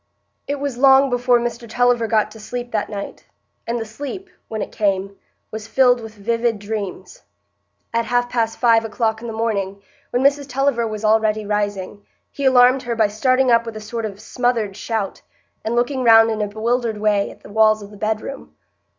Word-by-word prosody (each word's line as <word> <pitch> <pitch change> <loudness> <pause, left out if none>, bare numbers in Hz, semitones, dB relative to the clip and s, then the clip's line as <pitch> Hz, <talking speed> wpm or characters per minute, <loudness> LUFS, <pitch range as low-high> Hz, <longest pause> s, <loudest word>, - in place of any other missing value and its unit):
It 285 - -1
was 275 -3 -3
long 270 0 +6
before 245 0 +3
Mr 235 -1 -4
Tulliver 245 0 +2
got 215 -2 +1
to 220 - -12
sleep 240 +3 -6
that 210 -2 -1
night; 200 -2 -7 0.4
and 235 +1 -1
the 225 - -4
sleep, 290 - -7 0.2
when 220 -1 -3
it - - -8
came, 195 -2 -1 0.4
was 220 0 -6
filled 245 0 +3
with 220 -1 -10
vivid 230 +2 0
dreams. 200 -3 -6 0.7
At 230 0 +1
half 245 +2 +1
past 230 -2 -1
five 230 -2 +4
o'clock 220 0 -1
in 235 - -6
the - - -4
morning, 205 -3 -2 0.3
when 245 +2 0
Mrs 285 0 +2
Tulliver 260 -3 +1
was 215 0 -4
already 215 0 +2
rising, 205 -1 -3 0.3
he 280 - -4
alarmed 255 0 +5
her 240 -2 -3
by 220 -2 +3
starting 255 +4 +2
up 230 0 +5
with 230 -2 -7
a - - -5
sort 225 +1 -5
of 200 -1 -10
smothered 235 -5 -1
shout, 210 -1 -3 0.4
and 225 +2 -2
looking 255 +2 0
round 225 -1 +7
in 215 -1 -2
a 210 - 0
bewildered 225 +2 -1
way 210 -1 +1
at - - -14
the - - -13
walls 215 0 +3
of 200 - -12
the - - -12
bedroom. 200 - -4
225 Hz, 195 wpm, -20 LUFS, 215-245 Hz, 0.7 s, round